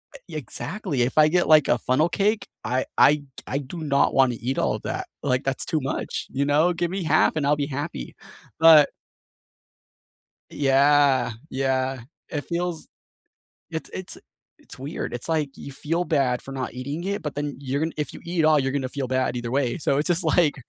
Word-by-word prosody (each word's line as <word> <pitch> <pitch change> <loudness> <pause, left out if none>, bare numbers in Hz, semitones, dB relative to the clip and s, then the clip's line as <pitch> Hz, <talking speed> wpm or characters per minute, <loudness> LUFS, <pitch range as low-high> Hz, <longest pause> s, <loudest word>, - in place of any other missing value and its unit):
eh - - -7
ye 160 - -9
exactly. 160 - -4
If 130 - -2
I 155 0 +7
get, 175 +2 +2
like, 155 -3 +6
a - - +3
funnel 150 +7 +1
cake, 205 +5 0 0.2
I 125 +3 0
I 145 - +7
t 145 - -13 0.2
I 135 - -1
do 145 +5 -7
not 140 -2 +2
wanna 130 -3 +3
eat 130 +3 -2
all - - +1
of - - -7
that, - - -4 0.2
like, 125 +1 +1
that's 135 -1 -2
too 160 - 0
much, 135 - -3
you 140 +1 0
know? 155 +5 +3
Give 175 0 -2
me 190 -2 -3
half, 155 +1 +3
and 150 -3 0
I'll 145 - +4
be 145 -1 -2
happy. 145 - -5 0.4
But 160 -3 +8 1.6
Yeah, 140 -2 +3 0.2
yeah, 130 0 0 0.3
it 145 -2 -3
feels 170 -1 -3 0.8
it's 160 -1 -5
it's 185 - -6 0.4
it's - - -14
weird, 145 +5 -5
it's 120 +6 -6
like 155 -3 +1
you 140 - -9
feel 165 +5 -2
bad 135 -7 +1
for 135 - -10
not 130 -2 -4
eating 140 +6 -5
it, 200 0 -2
but 150 -2 -5
then 145 -1 -3
you're 140 +1 -2
gon 160 - 0
if 150 -4 -3
you - - -9
eat 170 0 -3
it 155 - +4
all, 155 -1 +5
you're 135 0 0
gonna 135 -2 -2
feel 135 -1 -4
bad 130 -1 0
either 120 0 -4
way, 130 -3 0
so 140 -4 0
it's 150 - 0
just 175 0 +1
like, 160 -1 +3
145 Hz, 205 wpm, -24 LUFS, 135-160 Hz, 1.6 s, But